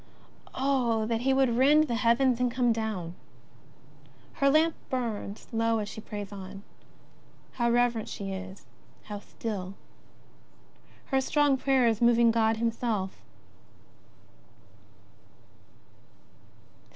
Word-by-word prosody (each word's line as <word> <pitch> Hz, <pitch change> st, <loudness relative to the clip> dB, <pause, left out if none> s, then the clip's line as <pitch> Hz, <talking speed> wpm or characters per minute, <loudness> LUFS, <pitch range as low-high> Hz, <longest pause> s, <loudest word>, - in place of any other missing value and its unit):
Oh, 250 Hz, -5 st, +1 dB
that 230 Hz, 0 st, -1 dB
He 270 Hz, +2 st, +2 dB
would 265 Hz, -3 st, +2 dB
rend 295 Hz, +4 st, +5 dB
the 290 Hz, -, -3 dB
heavens 240 Hz, +2 st, +2 dB
and 250 Hz, -1 st, +1 dB
come 245 Hz, -1 st, +2 dB
down! 215 Hz, -7 st, -4 dB, 1.2 s
Her 275 Hz, -, +2 dB
lamp 315 Hz, +3 st, +4 dB, 0.2 s
burns 225 Hz, -5 st, -4 dB
low 230 Hz, 0 st, +1 dB
as 210 Hz, -1 st, -3 dB
she 220 Hz, -, -8 dB
prays 205 Hz, -1 st, -7 dB
on. 195 Hz, 0 st, -9 dB, 0.9 s
How 235 Hz, -1 st, 0 dB
reverent 240 Hz, -2 st, +1 dB
she 195 Hz, -1 st, -5 dB
is, 190 Hz, 0 st, -8 dB, 0.4 s
how 205 Hz, -1 st, -7 dB
still. 200 Hz, -3 st, -6 dB, 1.4 s
Her 265 Hz, 0 st, +3 dB
strong 290 Hz, 0 st, +2 dB
prayer 265 Hz, -1 st, +2 dB
is 225 Hz, -1 st, 0 dB
moving 235 Hz, -1 st, +5 dB
God 225 Hz, -1 st, +2 dB
Himself. 225 Hz, -4 st, -2 dB
230 Hz, 110 wpm, -28 LUFS, 210-255 Hz, 1.4 s, rend